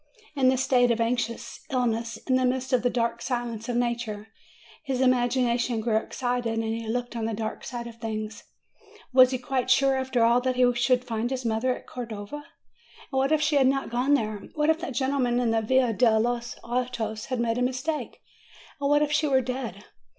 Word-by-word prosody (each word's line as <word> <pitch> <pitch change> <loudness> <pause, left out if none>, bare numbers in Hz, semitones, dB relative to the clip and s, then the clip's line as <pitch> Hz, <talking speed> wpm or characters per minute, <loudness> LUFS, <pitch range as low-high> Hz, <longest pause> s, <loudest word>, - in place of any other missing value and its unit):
In 260 -2 +4
this 260 0 +2
state 245 -2 +3
of 235 -1 +1
anxious 235 0 -2
illness, 235 -3 -1
in 260 - +1
the 255 0 +3
midst 260 +1 0
of 250 - +4
that 245 - +2
dark 235 -1 0
silence 240 -2 -3
of 240 - -1
nature, 235 -3 -2 0.5
his 265 -3 -2
imagination 245 -2 +2
grew 220 0 +1
excited, 245 0 -2
and 225 0 -2
looked 245 0 -3
on 225 -1 -2
the 225 -1 -2
dark 220 0 -4
side 240 -2 -5
of 235 -1 -9
things. 220 0 -5 0.7
Was 255 -1 +8
he 260 - -1
quite 255 0 -2
sure, 270 +1 +4
after 260 -2 +1
all, 235 +2 +4
that 255 0 0
he 250 -1 +4
should 245 +1 +2
find 230 0 -2
his 260 -1 -4
mother 230 +3 +1
at - - -12
Cordova? 225 0 -6
And 295 - -11 0.7
what 270 +1 +1
if 310 -1 +3
she 300 -1 +2
had 265 -2 +5
not 270 -2 0
gone 255 +4 +3
there? 215 -5 -2 0.2
What 300 +1 +3
if 320 - -1
that 330 -7 -5
gentleman 260 -2 +1
in 240 -2 +1
the 225 0 +2
Via 250 +1 +2
del 220 -1 +4
los 240 0 -2
Artes 235 -3 -3
had 255 -2 -3
made 235 0 0
a - - -1
mistake? 260 +5 -2 0.6
And 280 0 0
what 290 +1 +4
if 300 - -1
she 305 0 +2
were 265 -2 +3
dead? 240 -6 -5
245 Hz, 205 wpm, -26 LUFS, 230-260 Hz, 0.7 s, Was